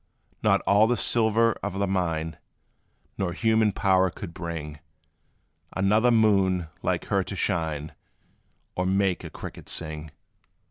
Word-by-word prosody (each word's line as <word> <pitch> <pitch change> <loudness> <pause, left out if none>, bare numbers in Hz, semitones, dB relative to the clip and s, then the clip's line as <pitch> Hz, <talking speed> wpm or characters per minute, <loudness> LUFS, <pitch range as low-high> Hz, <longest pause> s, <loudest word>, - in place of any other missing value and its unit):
Not - - +3
all 105 +2 +4
the 120 +1 +1
silver 115 0 +3
of 100 -1 -4
the 100 - +1
mine, 80 -4 -1 0.8
Nor 90 -3 -1
human 110 0 +2
power 95 -1 +2
could 85 - -8
bring 80 -4 -6 1.0
Another 105 +5 +3
moon 95 -7 +3
like - - -1
her 100 -1 +1
to 95 +2 -6
shine, 80 -5 -1 0.8
Or 90 0 -1
make 95 -1 +1
a - - -6
cricket - - -9
sing. 80 -1 -4
95 Hz, 130 wpm, -26 LUFS, 85-105 Hz, 1.0 s, all